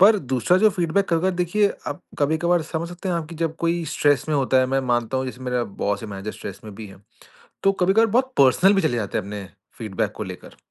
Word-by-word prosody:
पर 210 +3 +7
दूसरा 130 - +1
जो 215 +1 +6
फ़ीडबैक 180 +2 +1
कभी-कभार 170 +2 +2
देखिए, 180 +4 +2 0.2
आप 145 - -4 0.2
कभी-कभार 160 +3 +2
समझ 160 +1 -4
सकते 175 +2 -6
हैं 175 - +1
आप 165 -2 -3
कि 170 - -9
जब 165 -1 -1
कोई 170 0 0
स्ट्रेस 145 -2 +2
में 155 - +1
होता 130 -1 +2
है, 130 - +2
मैं 135 +1 +1
मानता 120 -1 0
हूँ 130 - -1
जैसे 130 0 -7
मेरा 125 -1 -1 0.2
बॉस 100 +1 0
है 110 - -6
मैनेजर 100 +1 -6
स्ट्रेस 100 -1 -8
में 105 -2 -9
भी 110 +1 -8
है। 95 - -13 0.7
तो 195 - +4
कभी-कभार 195 +4 +3
बहुत 255 +4 +1
पर्सनल 140 +9 +5
भी 195 - +2
चले 145 -6 +1
जाते 105 -3 -2
हैं - - -3
अपने 100 0 -6 0.3
फ़ीडबैक 110 -5 -2
को - - -4
लेकर। - - -10
155 Hz, 240 wpm, -23 LUFS, 125-180 Hz, 0.7 s, पर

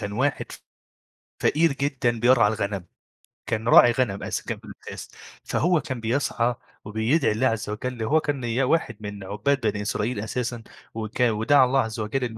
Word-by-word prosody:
كان 100 0 -4
واحد 135 +6 -1
ف - - -11 0.8
فقير 165 0 +3
جدًا 135 -4 -1
بيرعى 120 -2 +5
الغنم، 100 -3 -2 0.6
كان 110 0 -2
راعي 120 - +8
غنم 115 -5 -1
أس - - -3
كان - - -5
في - - -17
الأساس، - - -9 0.3
فهو 175 -1 +1
كان 130 -3 -5
بيسعى 120 0 0 0.3
وبيدعي 110 +8 +1
الله 115 +5 +1
عزّ 115 -3 -2
وجَل 115 +2 -4
هو 155 +8 +3
كان 145 -3 -2
نيا 120 +2 -1
واحد 125 -6 0
من 105 -2 -7
عُبّاد 105 +8 -1
بني 105 0 -1
إسرائيل 105 +2 -2
أساسًا، 120 +1 -3 0.3
وكا 115 +2 0
ودعى 130 +5 +4
الله 135 +2 +2
عزّ 110 -2 -2
وجَل 115 +5 -2
إن 115 -2 -4
120 Hz, 175 wpm, -24 LUFS, 110-130 Hz, 0.8 s, راعي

